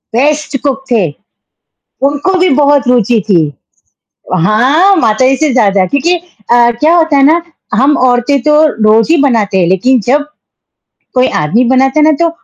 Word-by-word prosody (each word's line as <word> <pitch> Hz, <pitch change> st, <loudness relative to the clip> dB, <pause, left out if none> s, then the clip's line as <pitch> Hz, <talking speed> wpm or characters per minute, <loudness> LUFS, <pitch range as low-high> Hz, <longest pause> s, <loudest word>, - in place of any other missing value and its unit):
Best 295 Hz, +2 st, -1 dB
cook 275 Hz, -1 st, -2 dB
थे, 230 Hz, -, +2 dB, 1.1 s
उनको 290 Hz, +6 st, -2 dB
भी 365 Hz, 0 st, +2 dB
बहुत 285 Hz, -1 st, +1 dB
रुचि 240 Hz, -2 st, +1 dB
थी। 180 Hz, -5 st, +3 dB, 1.0 s
हाँ, 280 Hz, -, +2 dB
माताजी 255 Hz, +1 st, +1 dB
से 305 Hz, -1 st, -1 dB
ज़्यादा, 200 Hz, -6 st, +1 dB
क्योंकि 310 Hz, +6 st, 0 dB, 0.4 s
अ, 240 Hz, 0 st, +3 dB
क्या 320 Hz, +3 st, +2 dB
होता 325 Hz, -4 st, +1 dB
है 275 Hz, -, +2 dB
ना, 330 Hz, +4 st, +2 dB, 0.3 s
हम 275 Hz, +6 st, +2 dB
औरतें 245 Hz, +3 st, 0 dB
तो 300 Hz, +1 st, +1 dB, 0.3 s
रोज़ 220 Hz, +6 st, +2 dB
ही -, -, +3 dB
बनाते 220 Hz, -8 st, 0 dB
हैं, 175 Hz, -, +1 dB
लेकिन 230 Hz, +8 st, +1 dB
जब 290 Hz, +4 st, +1 dB, 0.9 s
कोई 255 Hz, 0 st, +1 dB
आदमी 210 Hz, +12 st, 0 dB
बनाता 265 Hz, +3 st, +1 dB
है -, -, +3 dB
ना 310 Hz, -, +4 dB
तो 335 Hz, -, +2 dB
265 Hz, 160 wpm, -10 LUFS, 235-300 Hz, 1.1 s, ना